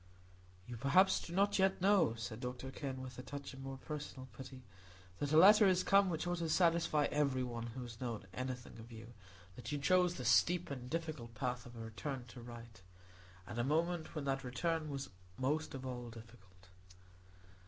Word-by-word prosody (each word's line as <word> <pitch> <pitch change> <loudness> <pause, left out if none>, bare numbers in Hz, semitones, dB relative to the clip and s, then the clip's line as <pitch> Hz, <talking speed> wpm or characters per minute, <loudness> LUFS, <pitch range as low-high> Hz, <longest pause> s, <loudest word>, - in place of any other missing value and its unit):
"You 120 +1 -7
perhaps 180 - +4
do - - -8
not 200 +3 +2
yet 190 0 +3
know," 190 - +4
said 110 0 -5
Dr 125 +1 -5
Kenn, 130 -1 -5
with 130 -1 -8
a - - -3
touch 140 +2 -7
of 130 - -10
more 135 0 -6
personal 140 -2 -6
pity, 130 -1 -9 0.6
"that 145 0 -1
a 155 - +5
letter 205 +4 +9
is 185 -1 +3
come 195 -1 +5
which 160 -1 -2
ought 175 0 -1
to 165 -1 -1
satisfy 165 -3 +3
every 140 -3 +1
one 120 -2 -4
who 125 +2 -6
has 115 -1 -9
known 115 -5 -3
anything 130 -1 -5
of 115 +2 -11
you, 115 +1 -10 0.4
that 120 +1 -7
you 145 - 0
chose 180 +4 +3
the 125 - -5
steep 165 +9 +4
and 125 -2 -6
difficult 155 -8 -4
path 125 +2 -2
of 120 - -12
a - - -9
return 120 +4 -5
to 125 - -10
the - - -9
right, 115 -4 -10 0.6
at 105 - -7
the 120 - +1
moment 165 +4 0
when 150 -2 -3
that 135 0 -1
return 155 +5 -1
was 140 -1 -5 0.3
most 145 +3 -1
of 130 0 -6
all 120 -2 -5
difficult." 100 -5 -14
130 Hz, 195 wpm, -36 LUFS, 120-160 Hz, 0.6 s, letter